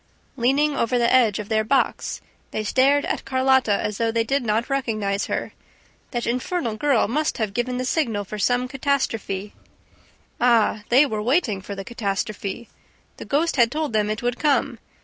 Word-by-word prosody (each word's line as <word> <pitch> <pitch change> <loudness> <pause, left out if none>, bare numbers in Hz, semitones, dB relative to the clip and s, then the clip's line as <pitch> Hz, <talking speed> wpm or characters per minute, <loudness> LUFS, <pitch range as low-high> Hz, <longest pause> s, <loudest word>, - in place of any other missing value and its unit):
Leaning 280 +4 +2
over 245 0 +1
the 240 - +2
ledge 235 -4 +4
of 210 - -5
their 220 0 +1
box, 265 +5 0 0.3
they 215 - -3
stared 275 +6 +3
at - - -2
Carlotta 260 -3 +2
as 210 0 -2
though 230 -1 +1
they 230 0 +1
did 270 +3 0
not 220 +1 0
recognize 215 -7 -1
her. - - -3 0.6
That 240 -2 -3
infernal 250 0 -2
girl 270 0 +2
must 300 +7 -1
have 215 -3 -2
given 250 +2 -1
the 255 - -2
signal 240 -8 0
for 210 +2 -7
some 245 +4 +1
catastrophe. 230 -7 -2 0.9
Ah, 230 -3 +3
they 265 +5 +6
were 215 -6 -3
waiting 230 - +1
for 200 +1 -7
the 195 0 -7
catastrophe! 210 0 -4 0.5
The - - -8
ghost 310 +2 0
had 235 -2 +4
told 305 -4 -2
them 210 -1 +1
it 215 +2 -3
would 245 0 -1
come! 275 -5 +1
235 Hz, 175 wpm, -23 LUFS, 215-270 Hz, 0.9 s, they